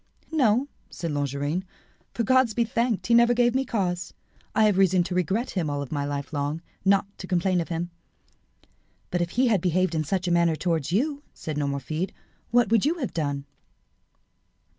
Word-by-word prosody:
"No," 260 -4 +3 0.2
said 170 -2 -4
Longarine, 145 +4 -1 0.5
"for, 235 - 0
God 255 -1 +3
be 235 - +3
thanked, 230 -1 0
he 235 - +2
never 235 +1 +6
gave 240 0 +3
me 265 +1 +1
cause. 185 -8 -2 0.4
I 220 - +4
have 205 -3 +3
reason 185 -2 +4
to 180 - -4
regret 190 +7 0
him 170 -6 -1
all 145 0 -2
my 145 -2 -1
life 145 +1 -4
long, 145 +3 -2 0.2
not 195 0 +4
to 185 - -7
complain 180 0 +1
of 165 - -6
him." 170 +1 -3 1.2
"But 175 - 0
if 175 - 0
he 260 - +5
had 205 -6 +2
behaved 185 0 +1
in 155 -1 0
such 185 +4 -1
a - - +1
manner 170 -1 +3
towards 165 -3 -1
you," 280 - 0
said 155 - -5
Nomerfide, 145 +4 -2 0.4
"what 240 -3 +3
would 225 -3 +4
you 310 +4 +2
have 285 -8 -4
done?" 145 -3 -2
180 Hz, 185 wpm, -26 LUFS, 160-230 Hz, 1.2 s, never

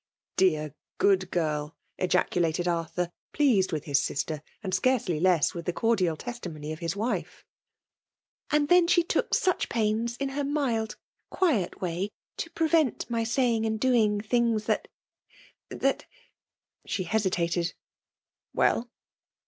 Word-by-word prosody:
" - - -69
Dear, 155 -6 +2 0.2
good 190 -2 +3
girl! 155 -3 -1
'* - - -48
ejaculated 175 -2 +1
Arthur, 170 +1 -1 0.2
pleased 240 -11 +3
with 155 -3 -2
his 140 -2 +2
sister, 145 +2 -2 0.2
and 190 -2 -3
scarcely 190 -5 +1
less 175 -3 +3
with 170 0 -7
the 175 - 0
cordial 185 -7 +1
testimony 160 -11 -6
of 155 - -9
his 165 +1 -2
wife. 225 +5 -3 1.0
''And 300 -1 +2
then 355 -1 +6
she 345 0 +4
took 340 - 0
such 370 - +1
pains, 230 +1 0
in 275 -1 -2
her 285 +1 -2
mild, 265 -7 -1 0.3
quiet 280 - 0
way, 180 +2 -2 0.3
to 335 - -4
prevent 320 -7 +1
my 230 -1 +1
saying 230 -1 +1
and 220 -1 -1
doing 220 -5 +3
things 230 -1 +1
that - - 0 0.5
— - - -27
that - - +1 0.4
" - - -52
she 190 - -1
hesitated. 175 -3 0 0.8
''Well?" 240 +1 +2
205 Hz, 140 wpm, -27 LUFS, 170-245 Hz, 1.0 s, then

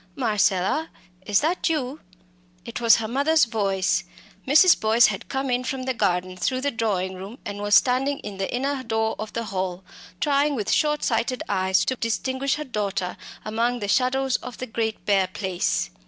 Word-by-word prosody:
"Marcella, 215 - +1 0.4
is 205 -1 +3
that 335 +4 0
you?" 295 -2 -2 0.7
It 235 +1 -6
was 230 -2 +7
her 220 - -2
mother's 285 +6 +3
voice. 195 -4 0 0.4
Mrs. 310 +6 +6
Boyce 220 +2 +5
had 195 -3 -2
come 270 -1 -2
in 245 +1 0
from 260 0 -3
the 260 0 -1
garden 185 -4 0
through 255 +8 -1
the 285 +1 0
drawing 200 -6 -1
room, 195 +6 -9
and 205 0 -5
was 205 0 +3
standing 270 +3 +3
at 200 -2 -7
the 195 - -2
inner 270 +2 -1
door 220 -2 -1
of 215 0 -5
the 230 - -2
hall, 190 -3 -3 0.4
trying 285 0 +2
with 210 -5 -2
shortsighted 255 -5 +1
eyes 190 -1 +1
to 260 - 0
distinguish 260 +4 -1
her 300 - -4
daughter 200 -8 -3 0.3
among 230 +3 0
the 205 - -3
shadows 260 +3 +2
of 250 - -9
the 255 - -4
great 220 -2 -3
bare 195 -2 +3
place. 185 - -2
230 Hz, 175 wpm, -24 LUFS, 200-265 Hz, 0.7 s, was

